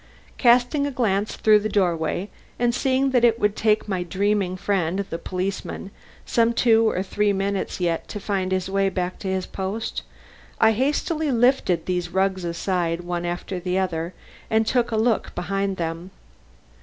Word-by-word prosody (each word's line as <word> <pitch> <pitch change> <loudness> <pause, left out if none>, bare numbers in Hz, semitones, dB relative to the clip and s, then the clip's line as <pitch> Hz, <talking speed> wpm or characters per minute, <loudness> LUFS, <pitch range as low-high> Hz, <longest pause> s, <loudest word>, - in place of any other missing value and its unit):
Casting 250 +4 +4
a - - -3
glance 210 -5 0
through 215 -1 +5
the 215 +1 -2
doorway 175 -2 0 0.3
and 240 0 +1
seeing 265 +1 +1
that 245 -2 +3
it 230 -1 +4
would 210 -2 +1
take 215 -1 +1
my 190 -3 -1
dreaming 190 +1 0
friend, 190 -1 0
the 165 - -3
policeman, 190 +1 -4 0.3
some 235 0 +2
two 225 -2 +4
or 185 - -1
three 205 +1 +1
minutes 195 0 -2
yet 170 -2 -1
to 210 - -6
find 195 -2 -2
his 185 -1 0
way 195 0 +1
back 180 -1 -3
to 200 - -5
his 190 -1 -1
post, 195 +4 -4 0.6
I 220 0 +6
hastily 295 - 0
lifted 235 - +2
these 180 -1 -1
rugs 190 0 0
aside, 170 0 -1
one 175 0 -3
after 175 +2 -4
the 180 +1 -1
other, 170 -2 -2 0.3
and 220 0 +2
took 245 +1 +1
a 225 - -1
look 225 0 +1
behind 195 +2 -2
them. 165 +2 -4
195 Hz, 170 wpm, -23 LUFS, 180-225 Hz, 0.6 s, I